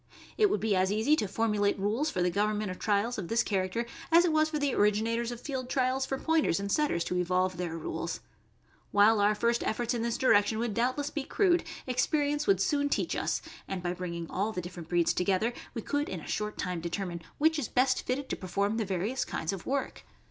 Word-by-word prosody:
It 425 -2 +4
would 210 - +1
be 210 0 +1
as 190 +1 +2
easy 220 +9 +3
to 210 - 0
formulate 205 0 +1
rules 215 +10 0
for 180 -11 -1
the 180 - +2
government 210 +1 0
of 185 - -8
trials 215 +3 0
of 180 - -4
this 230 +4 +2
character 195 +3 -1 0.3
as 340 +2 +7
it 345 - +2
was 310 0 +3
for 310 - -2
the 285 -2 0
originators 225 +3 +1
of 240 - -6
field 255 -2 -4
trials 260 0 +1
for 270 - -2
Pointers 320 - +1
and 200 0 -3
Setters 290 - +1
to 180 - -2
evolve 185 +1 +1
their 170 -2 -3
rules. 160 - -4 0.7
While 210 +2 +5
our 210 +1 +4
first 235 +2 +1
efforts 240 +2 -1
in 235 - -1
this 235 0 -1
direction 220 -3 +3
would 230 -1 -1
doubtless 255 +6 0
be 295 - -2
crude, 355 +2 +2 0.2
experience 290 +3 0
would 195 -2 +4
soon 285 +6 +1
teach - - 0
us; - - -1 0.2
and 190 -2 -4
by 175 0 -1
bringing 170 -2 -5
all 205 +4 0
the 185 - -4
different 175 -2 -8
breeds 175 -1 +2
together, 195 +6 +1 0.2
we 230 - -4
could 290 +1 -1
in 185 - -4
a - - -11
short 210 0 -3
time 180 -3 -3
determine 170 0 -4 0.2
which 315 +1 +3
is 270 - -2
best 255 +1 +2
fitted 265 +2 -2
to - - -1
perform 200 +4 -1
the 220 - 0
various 200 +7 -1
kinds 160 +4 -3
of 190 - -7
work. 275 0 -2
215 Hz, 220 wpm, -30 LUFS, 185-260 Hz, 0.7 s, as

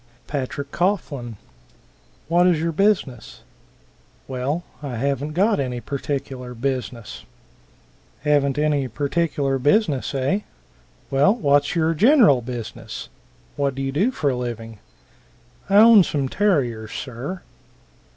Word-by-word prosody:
Patrick 140 0 -4
Coughlin. 155 - -1 0.9
"What 175 +1 +4
is 175 -4 +3
your 165 +1 -1
business?" 170 - 0 0.9
"Well 135 +6 -2 0.2
I 140 -4 -5
haven't 140 +4 -2
got 200 +4 +2
any 125 -3 -2
particular 130 -1 -5
business." 125 -2 -4 1.0
"Haven't 145 -2 +2
any 145 -3 +1
particular 140 +1 -1
business, 145 - +1
eh? 135 +10 +1 0.7
Well, 140 +10 +4
what's 145 -10 +2
your 165 -1 +2
general 210 - +5
business? 120 -2 -7 0.5
What 140 -2 -1
do 135 - -3
you 135 - -2
do 185 - +2
for 150 - 0
a - - -2
living?" 115 -3 -6 0.9
"I 195 - +2
own 220 -1 +8
some 140 -5 -1
terriers, 125 - 0
sir." 135 +9 -6
140 Hz, 115 wpm, -22 LUFS, 130-170 Hz, 1.0 s, own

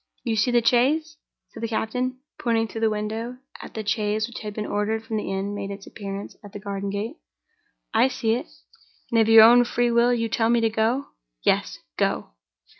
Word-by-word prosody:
"You 230 -3 0
see 215 +3 +2
the 240 -1 +2
chaise?" 300 +6 +2 0.3
said 225 - -11
the 230 - -1
captain, 250 +3 -2 0.2
pointing 225 -2 +1
through 225 - -7
the 225 - +3
window 220 +3 -3 0.2
as - - -9
the 220 -1 -5
chaise 210 0 0
which 240 - -8
had 210 -1 -5
been 215 - -3
ordered 215 +2 -1
from 225 -1 -3
the 210 - -3
inn 195 +1 -2
made 200 -1 -4
its 200 0 -8
appearance 200 -1 -7
at 205 0 -12
the 205 - -6
garden 200 -1 -4
gate. 210 - -4 0.8
"I 230 +3 +5
see 235 -4 0
it." - - -3 0.6
"And, 230 -1 +4
of 220 - +2
your 225 -1 +10
own 240 +2 +8
free 240 0 0
will, 235 +1 +4
you 230 -2 +1
tell 225 0 +1
me 235 0 +4
to 225 -1 +1
go?" 230 +5 +1 0.4
"Yes. - - +1 0.2
Go!" - - 0
225 Hz, 205 wpm, -24 LUFS, 210-240 Hz, 0.8 s, your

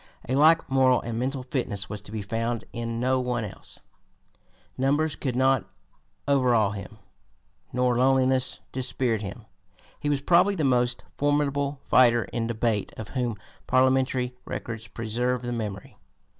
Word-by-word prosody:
A 130 - -1
like 155 +4 +5
moral 130 -2 +4
and 115 -1 -4
mental 130 +1 -2
fitness 125 -7 -2
was 105 -1 -6
to 100 - -11
be 110 -2 -4
found 115 +3 -2
in 115 -1 -3
no 130 +1 +2
one 125 -2 -1
else. 95 - -11 0.9
Numbers 145 +3 +1
could 130 -4 -3
not 130 -2 +2 0.6
overawe 125 -7 +3
him, 100 +1 -8 0.7
nor 125 0 +1
loneliness 130 0 +2
dispirit 125 -3 -1
him. 105 +3 -7 0.5
He 145 - -2
was 145 -1 +1
probably 180 +5 +4
the 160 - -1
most 125 -2 +1
formidable 145 -1 0
fighter 120 -2 +5
in 115 -1 -3
debate 110 -3 -1
of 110 - -7
whom 120 -4 -2 0.3
parliamentary 130 -1 +2
records 115 -2 -6
preserve 120 +2 -2
the 120 - -3
memory. 105 -4 -5
125 Hz, 145 wpm, -26 LUFS, 115-135 Hz, 0.9 s, like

